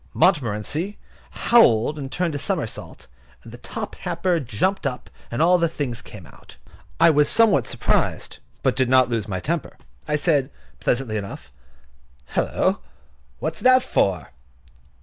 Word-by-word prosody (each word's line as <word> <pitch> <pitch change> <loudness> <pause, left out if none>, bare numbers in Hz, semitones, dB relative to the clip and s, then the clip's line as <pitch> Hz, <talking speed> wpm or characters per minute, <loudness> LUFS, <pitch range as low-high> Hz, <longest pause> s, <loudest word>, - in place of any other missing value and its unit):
Montmorency 150 - 0 0.3
howled, 150 - +3
and 135 -1 -6
turned 175 -3 -1
a 145 - -3
somersault, 160 - -4 0.4
and - - -12
the 120 - -10
top 215 - -6
hamper 175 0 -1
jumped 140 - -1
up, 125 -2 -6 0.2
and 120 +6 0
all 180 +1 +5
the 170 - +3
things 130 -7 -4
came 105 -7 -12
out. - - -17 0.4
I 165 0 +7
was 150 -1 +3
somewhat 205 - +3
surprised, - - -1 0.2
but - - +3
I - - -19
did 130 -2 +2
not 130 -1 +5
lose 115 -3 -2
my 95 -3 -3
temper. 90 - -3 0.3
I 150 - +1
said, 145 -3 +1 0.3
pleasantly 120 -4 -1
enough: 100 -1 -7 0.8
"Hulloa! - - +1 0.6
what's - - -4
that 255 0 +5
for?" 90 -9 0
145 Hz, 150 wpm, -22 LUFS, 115-175 Hz, 0.8 s, I